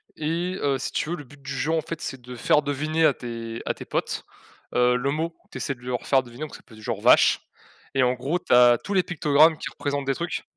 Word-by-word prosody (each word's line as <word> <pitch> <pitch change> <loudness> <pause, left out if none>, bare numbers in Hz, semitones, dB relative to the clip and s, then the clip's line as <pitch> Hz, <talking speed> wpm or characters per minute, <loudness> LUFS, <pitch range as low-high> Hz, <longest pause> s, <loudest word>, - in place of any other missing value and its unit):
et 170 +4 -2
heu, 140 -2 +1
si 130 - -4
tu - - -2
veux, 175 - -1
le 150 - -8
but 145 +1 -17
du 140 +1 -7
jeu, 140 +3 -1
en 165 -1 +2
fait, 165 +1 -6
c'est 135 -2 -5
de 125 +1 -9
faire 150 +5 +3
deviner 155 +3 0
à 145 - +5
tes 115 -2 -6
à - - 0
tes - - -10
potes, - - -2 0.5
heu, 125 0 +4
le 130 +3 0
mot 160 +3 -1
que - - -35 0.2
tu - - -5
essaies 140 - -2
de 120 - -22
leur 125 -1 -3
faire 135 -1 +4
deviner, 120 +2 -13
donc 155 - -7
ça - - -13
peut 120 - -19
être - - -14
du - - -14
genre 110 -3 -3
«vache», - - +5 0.5
et 135 - +4
en 125 0 +3
gros, 135 +8 -2
tu - - -1
as 120 -1 +7
tous 200 - -3
les 185 -2 +4
pictogrammes 155 -1 +4
qui - - -5
représentent 140 -1 -3
des 135 - +1
trucs. 170 +4 -3
140 Hz, 280 wpm, -25 LUFS, 125-155 Hz, 0.5 s, as